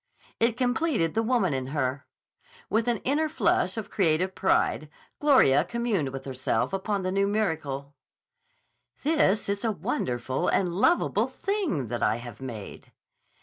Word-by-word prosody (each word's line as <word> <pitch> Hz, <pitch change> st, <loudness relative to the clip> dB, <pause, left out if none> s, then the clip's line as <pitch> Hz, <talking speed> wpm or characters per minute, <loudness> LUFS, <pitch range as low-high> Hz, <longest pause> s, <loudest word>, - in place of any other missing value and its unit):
It 230 Hz, +1 st, +2 dB
completed 250 Hz, -, +1 dB
the 225 Hz, -, +1 dB
woman 225 Hz, -, +1 dB
in 130 Hz, -1 st, -2 dB
her. 135 Hz, -1 st, -2 dB, 0.6 s
With 225 Hz, +2 st, +1 dB
an 235 Hz, -3 st, 0 dB
inner 305 Hz, +4 st, +1 dB
flush 325 Hz, -, +1 dB
of 220 Hz, -, -5 dB
creative 185 Hz, 0 st, +2 dB
pride 155 Hz, -5 st, +1 dB, 0.3 s
Gloria 255 Hz, -, +5 dB
communed 205 Hz, -, -1 dB
with 135 Hz, 0 st, -7 dB
herself 130 Hz, 0 st, -1 dB
upon 195 Hz, 0 st, -1 dB
the 185 Hz, -, -1 dB
new 195 Hz, +1 st, +2 dB
miracle: 150 Hz, -9 st, -2 dB, 1.1 s
"This 280 Hz, -9 st, +2 dB
is 200 Hz, +2 st, -2 dB
a 225 Hz, -, +1 dB
wonderful 155 Hz, -, -2 dB
and 185 Hz, -, +2 dB
lovable 205 Hz, -, +2 dB
thing 355 Hz, -, -2 dB
that 120 Hz, 0 st, -3 dB
I 105 Hz, -, +2 dB
have 120 Hz, +2 st, -9 dB
made." 115 Hz, -6 st, -8 dB
190 Hz, 145 wpm, -27 LUFS, -, 1.1 s, Gloria